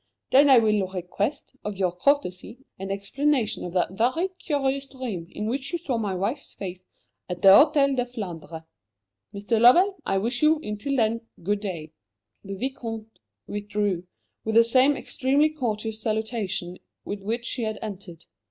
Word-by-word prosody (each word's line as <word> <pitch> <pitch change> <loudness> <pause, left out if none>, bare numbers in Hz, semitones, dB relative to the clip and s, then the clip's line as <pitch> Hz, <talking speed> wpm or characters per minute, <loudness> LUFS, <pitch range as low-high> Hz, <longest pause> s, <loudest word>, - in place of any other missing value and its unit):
Then 280 +2 +6
I 265 - +8
will 210 -4 +3
request, 190 - -3
of 210 -2 -4
your 185 -2 +1
courtesy, 205 0 0 0.2
an 195 0 -5
explanation 230 +5 0
of 175 - -6
that 180 -1 +1
very 255 - +1
curious 275 -3 -1
dream 235 -11 -5
in 210 - -5
which 265 +4 -2
you 345 - 0
saw 275 -8 -2
my 200 -4 -2
wife's 220 +10 -3
face 185 -1 -7 0.4
at 180 -1 -5
the 195 - +9
Hôtel 280 - +6
de 245 -1 0
Flandre. 170 -8 -7 0.7
Mr. 210 +3 -1
Lovell, 360 +11 +6
I 195 - 0
wish 235 +5 -1
you, 310 0 +4
until 210 +7 -3
then, 230 -2 +1 0.2
good 205 +3 0
day." 170 -7 -5 0.5
The 195 0 -6
Vicomte 225 -2 -5 0.3
withdrew, 205 -3 -2 0.4
with 220 0 -2
the 230 - +8
same 260 +4 +4
extremely 280 +4 +1
courteous 220 -6 -3
salutation 215 -5 -2 0.3
with 200 0 -5
which 230 +4 -3
he 250 - -3
had 220 -2 -2
entered. 190 -6 -8
220 Hz, 160 wpm, -25 LUFS, 195-265 Hz, 0.7 s, the